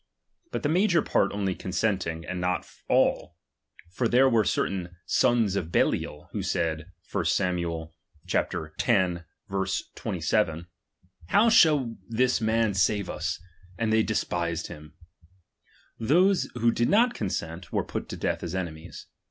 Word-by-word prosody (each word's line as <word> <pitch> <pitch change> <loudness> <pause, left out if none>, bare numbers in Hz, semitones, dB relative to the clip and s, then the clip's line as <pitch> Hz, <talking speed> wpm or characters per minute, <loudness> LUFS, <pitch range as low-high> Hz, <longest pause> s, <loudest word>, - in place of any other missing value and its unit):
But - - -3
the - - +2
major 175 -1 +3
part 100 - +1
only 100 -2 -1
consenting, 90 -4 -2
and 90 -1 -4
not 90 0 -1 0.2
all; - - +2 0.5
for 120 +6 0
there 130 +3 +5
were 115 -4 +3
certain 90 -2 -1
sons 110 0 +2
of' 85 -4 -3
Belial, 75 -2 0
who - - -3
said, 80 0 -1 0.2
(1 - - -1
Sam. 85 -3 0 0.4
x. - - 0 1.4
27), 80 +2 -1 0.6
How 220 - +4
shall 150 - +4
this 125 +2 +1
man 110 -1 +2
save 100 +1 +1
us? 85 +1 -3 0.4
And 110 -1 0
they 110 - +5
de 110 0 -1
spised 85 -3 -1
hint; 75 0 -11 1.1
those 180 - +3
who 120 -1 +3
did 120 +1 +1
not 235 +4 +4
consent, 85 -3 -4
were - - 0
put - - -5
to - - -5
death - - -1
as 85 +1 -4
enemies. 85 -2 -6
100 Hz, 135 wpm, -27 LUFS, 85-120 Hz, 1.4 s, there